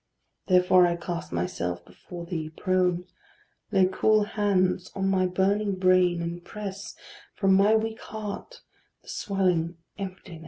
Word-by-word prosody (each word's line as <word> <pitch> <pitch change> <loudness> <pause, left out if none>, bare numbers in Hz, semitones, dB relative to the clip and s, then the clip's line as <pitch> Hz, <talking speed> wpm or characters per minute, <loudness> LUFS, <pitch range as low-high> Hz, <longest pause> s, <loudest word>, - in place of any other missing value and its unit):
Therefore 180 -1 +5
I 170 - 0
cast 170 0 -5
myself 85 0 -3
before 175 -1 -10
thee 160 -3 -4
prone: 180 +1 0 0.7
Lay 190 -2 +5
cool 215 +3 +3
hands 190 -3 0
on 195 -1 0
my 185 -1 +2
burning 195 +2 +1
brain, 185 -2 +3
and 170 +1 -5
press 200 +1 -7 0.4
From 195 -2 +3
my 200 +3 +5
weak 220 0 -1
heart 215 - -7 0.4
the - - -15
swelling 180 -4 0 0.2
emptiness. 185 -3 -7
185 Hz, 130 wpm, -26 LUFS, 175-200 Hz, 0.7 s, Therefore